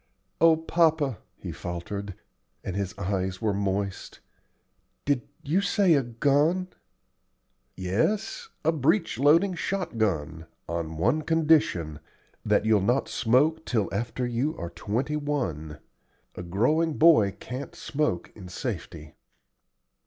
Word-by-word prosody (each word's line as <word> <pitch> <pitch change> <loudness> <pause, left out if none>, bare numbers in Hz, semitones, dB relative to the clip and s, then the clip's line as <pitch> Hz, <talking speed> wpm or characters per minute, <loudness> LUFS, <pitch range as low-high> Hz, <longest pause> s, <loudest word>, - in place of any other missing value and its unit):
"O 165 -1 +6
papa," 160 - +1 0.2
he - - -6
faltered, 90 +3 -5 0.5
and 95 - -4
his 100 +1 -3
eyes 95 -1 -2
were 110 -2 0
moist, 100 0 -3 0.9
"did 140 -3 +2 0.2
you 165 +8 +1
say 195 -2 +3
a 140 - +4
gun?" 145 +9 +1 1.1
"Yes, 210 - -1 0.2
a 160 - +5
breech 160 - +1
loading 165 +7 +4
shot 180 -7 -3
gun 80 -6 -1 0.2
on 80 -1 -4
one 120 - +2
condition 150 - +2 0.4
that - - +2
you'll 110 -2 +4
not 120 +7 +1
smoke 130 +7 +2
till 110 -6 -1
after 120 +4 -2
you 125 +6 -1
are 85 0 -5
twenty 115 - -2
one. 90 - -3 0.6
A - - -7
growing 125 - +1
boy 150 -12 +6
can't 130 +2 -7
smoke 145 - -2
in 95 -4 -10
safety." 85 - -6
120 Hz, 120 wpm, -27 LUFS, 95-155 Hz, 1.1 s, O